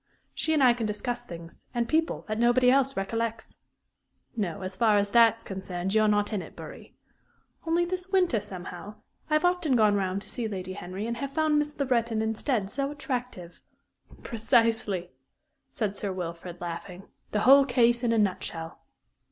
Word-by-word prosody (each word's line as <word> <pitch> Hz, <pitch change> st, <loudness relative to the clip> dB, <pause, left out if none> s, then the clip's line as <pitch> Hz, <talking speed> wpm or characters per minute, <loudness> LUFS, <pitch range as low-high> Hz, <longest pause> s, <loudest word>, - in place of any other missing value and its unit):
She 315 Hz, -, -1 dB
and 290 Hz, -, +3 dB
I 250 Hz, -2 st, +7 dB
can 235 Hz, -2 st, -2 dB
discuss 240 Hz, +3 st, -4 dB
things 170 Hz, -1 st, -10 dB
and 235 Hz, -1 st, 0 dB
people 320 Hz, +1 st, 0 dB
that 215 Hz, 0 st, -2 dB
nobody 245 Hz, +1 st, +4 dB
else 270 Hz, 0 st, +2 dB
recollects 225 Hz, +3 st, -3 dB, 0.8 s
no, 195 Hz, -6 st, -2 dB
as 185 Hz, 0 st, -5 dB
far 215 Hz, 0 st, +4 dB
as 200 Hz, 0 st, +1 dB
that's 230 Hz, 0 st, +5 dB
concerned, 190 Hz, -1 st, -4 dB
you're 215 Hz, 0 st, +4 dB
not 205 Hz, +1 st, +1 dB
in 205 Hz, -, -1 dB
it, -, -, -11 dB
Bury. -, -, -11 dB, 0.7 s
Only 340 Hz, +2 st, +2 dB
this 365 Hz, +1 st, -4 dB
winter, 360 Hz, -, +3 dB
somehow, 195 Hz, 0 st, -8 dB, 0.3 s
I -, -, -1 dB
have 305 Hz, -, +2 dB
often 355 Hz, -6 st, +2 dB
gone 215 Hz, -3 st, +4 dB
round 195 Hz, 0 st, -1 dB
to -, -, -13 dB
see 235 Hz, -2 st, -3 dB
Lady 185 Hz, -3 st, -5 dB
Henry, 185 Hz, +2 st, -6 dB
and 235 Hz, +1 st, -3 dB
have 275 Hz, +2 st, -5 dB
found 310 Hz, -2 st, +2 dB
Miss 295 Hz, 0 st, -3 dB
Le 280 Hz, -, +1 dB
Breton 235 Hz, -3 st, +1 dB
instead 220 Hz, 0 st, -1 dB
so 275 Hz, +2 st, -1 dB
attractive 250 Hz, -, -5 dB, 0.3 s
" -, -, -22 dB
"Precisely," 225 Hz, -6 st, +1 dB, 0.6 s
said 210 Hz, -4 st, -2 dB
Sir 200 Hz, -1 st, -3 dB
Wilfrid, 175 Hz, -1 st, -6 dB
laughing; 175 Hz, +2 st, -6 dB, 0.3 s
"the 210 Hz, -, 0 dB
whole 275 Hz, +3 st, +8 dB
case 240 Hz, -2 st, +3 dB
in 240 Hz, -2 st, +1 dB
a 230 Hz, -, +2 dB
nutshell." 175 Hz, -5 st, -2 dB
225 Hz, 175 wpm, -27 LUFS, 195-255 Hz, 0.8 s, whole